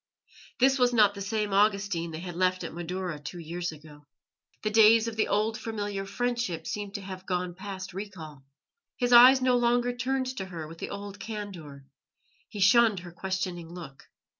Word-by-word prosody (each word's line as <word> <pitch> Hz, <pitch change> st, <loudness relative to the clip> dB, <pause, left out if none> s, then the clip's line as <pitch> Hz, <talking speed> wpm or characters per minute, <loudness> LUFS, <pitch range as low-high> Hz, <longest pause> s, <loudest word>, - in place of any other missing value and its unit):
This 265 Hz, +1 st, +4 dB
was 245 Hz, -1 st, +3 dB
not 210 Hz, -3 st, +5 dB
the 200 Hz, -, -8 dB
same 210 Hz, 0 st, -2 dB
Augustine 200 Hz, -4 st, +1 dB
that 160 Hz, -, -6 dB
they -, -, -7 dB
had 180 Hz, -1 st, -6 dB
left 185 Hz, 0 st, +1 dB
at 165 Hz, -, -6 dB
Madaura 175 Hz, -1 st, -4 dB
two 150 Hz, +5 st, -8 dB
years 170 Hz, +1 st, -4 dB
ago. 150 Hz, -1 st, -15 dB, 0.6 s
The 215 Hz, -, 0 dB
days 220 Hz, +1 st, +6 dB
of 230 Hz, -, -4 dB
the 220 Hz, -, +1 dB
old 220 Hz, +2 st, 0 dB
familiar 205 Hz, -3 st, -4 dB
friendship 235 Hz, -6 st, -2 dB
seemed 205 Hz, -1 st, -5 dB
to 205 Hz, -, -4 dB
have 190 Hz, -1 st, -9 dB
gone 180 Hz, -1 st, -2 dB
past 190 Hz, 0 st, -7 dB
recall. 170 Hz, -8 st, -8 dB, 0.5 s
His 245 Hz, -1 st, +1 dB
eyes 255 Hz, +2 st, +9 dB
no 255 Hz, -1 st, +4 dB
longer 245 Hz, 0 st, +1 dB
turned 260 Hz, +1 st, -2 dB
to 190 Hz, -, -3 dB
her 165 Hz, -4 st, -7 dB
with 165 Hz, +1 st, -12 dB
the -, -, -5 dB
old 200 Hz, 0 st, -7 dB
candour; 185 Hz, -11 st, -7 dB, 0.6 s
he 210 Hz, -, -8 dB
shunned 205 Hz, 0 st, +5 dB
her 175 Hz, -1 st, -10 dB
questioning 180 Hz, -1 st, -4 dB
look. 165 Hz, -6 st, -11 dB
195 Hz, 185 wpm, -28 LUFS, 175-220 Hz, 0.6 s, eyes